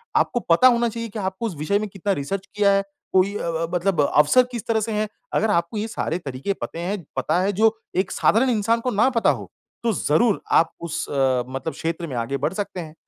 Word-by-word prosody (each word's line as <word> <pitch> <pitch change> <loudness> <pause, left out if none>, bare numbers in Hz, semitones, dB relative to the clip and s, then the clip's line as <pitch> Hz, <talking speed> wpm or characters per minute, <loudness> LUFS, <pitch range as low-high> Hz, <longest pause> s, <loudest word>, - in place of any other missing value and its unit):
आपको 240 - +2
पता 170 +10 +7
होना 235 -1 +3
चाहिए 230 0 -5
कि 215 - -6
आपको 190 +4 -3
उस 180 - -6
विषय 200 +7 +1
में 215 - -3
कितना 195 +1 -2
रिसर्च 190 +7 -3
किया 205 -1 +4
है? 195 0 +2 0.3
कोई 195 +2 +3
अ - - -5
अ, 165 0 -1
ब 180 - -4
मतलब 175 -3 +1
अवसर 150 +13 +6
किस 235 -4 -5
तरह 225 -1 +2
से 225 - -2
हैं, 215 0 0 0.3
अगर 220 -1 +2
आपको 170 +3 0
ये 215 +2 -2
सारे 180 -6 -2
तरीके 140 +5 -3
पते 165 - -5
हैं, 180 +1 -3
पता 180 - +1
है 200 +2 +1
जो 225 0 +4 0.2
एक 190 - +1
साधारण 250 +4 +3
इंसान 230 0 +2
को 250 - -1
ना 220 +6 +3
पता - - +4
हो, - - -2 0.3
तो 230 -2 +2
ज़रूर 190 +7 +2
आप 165 - +4
उस 170 -2 -3
अ, 130 -3 +1
मतलब 135 +4 -4
क्षेत्र 165 +1 -3
में 130 - -6
आगे 120 +4 -2
बढ़ 150 +6 -1
सकते 195 -2 -4
हैं। 155 -2 -7
195 Hz, 240 wpm, -23 LUFS, 165-220 Hz, 0.3 s, पता